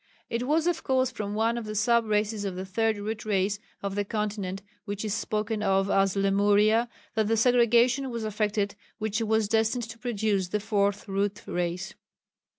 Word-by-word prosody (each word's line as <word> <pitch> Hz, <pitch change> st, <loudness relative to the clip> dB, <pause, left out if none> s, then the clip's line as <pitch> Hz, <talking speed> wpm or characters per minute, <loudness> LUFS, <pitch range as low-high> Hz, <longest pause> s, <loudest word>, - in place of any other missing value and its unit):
It 240 Hz, +2 st, -1 dB
was 310 Hz, +2 st, +2 dB
of 345 Hz, -2 st, 0 dB
course 260 Hz, -2 st, +1 dB
from 205 Hz, -1 st, -4 dB
one 230 Hz, +2 st, +1 dB
of 230 Hz, -, -7 dB
the 215 Hz, 0 st, -5 dB
sub 235 Hz, +2 st, +3 dB
races 210 Hz, 0 st, 0 dB
of 195 Hz, -2 st, -3 dB
the 185 Hz, +1 st, -5 dB
Third 220 Hz, +3 st, 0 dB
Root 215 Hz, +2 st, -4 dB
Race 205 Hz, -1 st, 0 dB, 0.2 s
on 200 Hz, -1 st, -2 dB
the 205 Hz, +1 st, 0 dB
continent 200 Hz, -2 st, -3 dB, 0.2 s
which 205 Hz, 0 st, -4 dB
is 210 Hz, -, -1 dB
spoken 215 Hz, 0 st, -2 dB
of 195 Hz, -1 st, +2 dB
as 195 Hz, -1 st, +3 dB
Lemuria, 205 Hz, +4 st, +3 dB, 0.2 s
that 220 Hz, -2 st, +1 dB
the 225 Hz, +1 st, +2 dB
segregation 245 Hz, +3 st, +4 dB
was 235 Hz, -2 st, -4 dB
effected 210 Hz, -1 st, -1 dB, 0.2 s
which 220 Hz, 0 st, -2 dB
was 220 Hz, -1 st, +2 dB
destined 225 Hz, +3 st, +1 dB
to 230 Hz, 0 st, -10 dB
produce 215 Hz, -5 st, 0 dB
the 210 Hz, +4 st, -1 dB
Fourth 205 Hz, -1 st, 0 dB
Root 200 Hz, +2 st, -1 dB
Race. 175 Hz, +1 st, -3 dB
215 Hz, 180 wpm, -27 LUFS, 200-225 Hz, 0.2 s, segregation